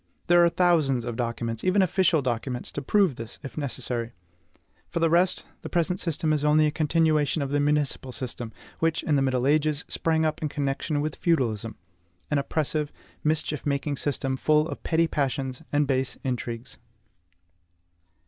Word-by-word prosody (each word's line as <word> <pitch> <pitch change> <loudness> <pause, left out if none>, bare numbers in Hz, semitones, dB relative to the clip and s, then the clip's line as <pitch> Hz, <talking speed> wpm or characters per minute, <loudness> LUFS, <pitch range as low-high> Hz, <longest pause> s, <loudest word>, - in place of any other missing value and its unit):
There 175 0 +6
are 170 - +5
thousands 155 -9 +2
of 120 -2 -3
documents, 115 -1 -3
even 185 +1 +4
official 180 -4 +2
documents, 125 0 -2
to 145 - -4
prove 185 - +2
this, 115 0 -7
if 135 - -8
necessary. 125 -4 -3 0.8
For - - -2
the 165 -1 +2
rest, 175 +2 +2 0.2
the - - -7
present 175 +1 +1
system 160 -2 0
is 150 -1 0
only 150 +1 +4
a 150 - +2
continuation 155 -1 +2
of 135 - -4
the 145 - +2
municipal 145 -2 +1
system, 120 -2 -5 0.3
which, 165 -1 +1
in 150 - +2
the 140 - +3
middle 130 -2 +1
ages, 150 +1 +2
sprang 160 -1 +1
up 155 -1 -1
in 155 - -1
connection 145 +1 -1
with 155 0 -3
feudalism, 115 - 0 0.6
an 150 - +3
oppressive, 150 +1 -1 0.3
mischief 155 -1 0
making 140 0 -1
system, 135 -1 -1
full 155 +2 +3
of 145 - -6
petty 165 0 +2
passions 135 -3 -2
and 145 0 +3
base 130 -1 -1
intrigues. 120 -2 -4
145 Hz, 165 wpm, -26 LUFS, 130-160 Hz, 0.8 s, There